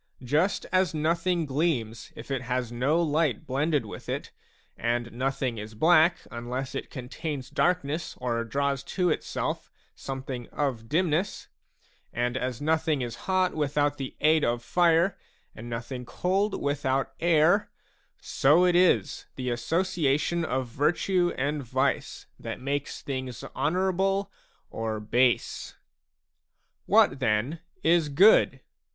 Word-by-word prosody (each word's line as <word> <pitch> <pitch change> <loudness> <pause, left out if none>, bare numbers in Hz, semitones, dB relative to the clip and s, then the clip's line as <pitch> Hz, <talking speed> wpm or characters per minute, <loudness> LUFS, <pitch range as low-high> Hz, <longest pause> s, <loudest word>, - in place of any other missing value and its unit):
Just 155 +10 +1
as 185 -2 +2
nothing 165 +2 +1
gleams 135 -6 -1
if - - -9
it 135 -2 -1
has 125 -1 -2
no 135 +7 +1
light 150 -6 0
blended 145 +3 0
with - - -9
it, - - -4 0.4
and 120 +1 -1
nothing 130 -1 -2
is 110 +1 -8
black 165 +6 +4
unless 125 +3 -4
it - - -5
contains 135 +1 -6
darkness 170 -3 0
or 120 -2 -1
draws 140 +3 -1
to 180 +4 0
itself - - -3 0.2
something 130 -2 -6
of 125 -6 -2
dimness, 170 +2 0 0.6
and 120 +1 -1
as 125 -2 -2
nothing 155 -2 +1
is 120 -1 -5
hot 185 -1 +2
without 145 -1 0
the 135 -1 -5
aid 155 0 +4
of 120 0 0
fire, 175 +4 +3 0.3
and 120 +2 -9
nothing 120 +2 -5
cold 190 - -1
without 135 -2 -1
air; 170 +4 +3 0.5
so 155 +7 +3
it 180 -1 +3
is 180 0 +2
the 125 -1 -3
association 165 +3 0
of 130 -4 -1
virtue 175 +8 +1
and 145 +2 -1
vice 130 +3 -1
that - - -6
makes 140 +2 -3
things 130 -3 -5
honourable 190 +4 0 0.4
or 110 -1 -3
base. 120 +4 0 1.1
What 130 - +4
then 125 +6 0 0.2
is 165 -2 +3
good 190 +10 +5
140 Hz, 125 wpm, -27 LUFS, 125-170 Hz, 1.1 s, good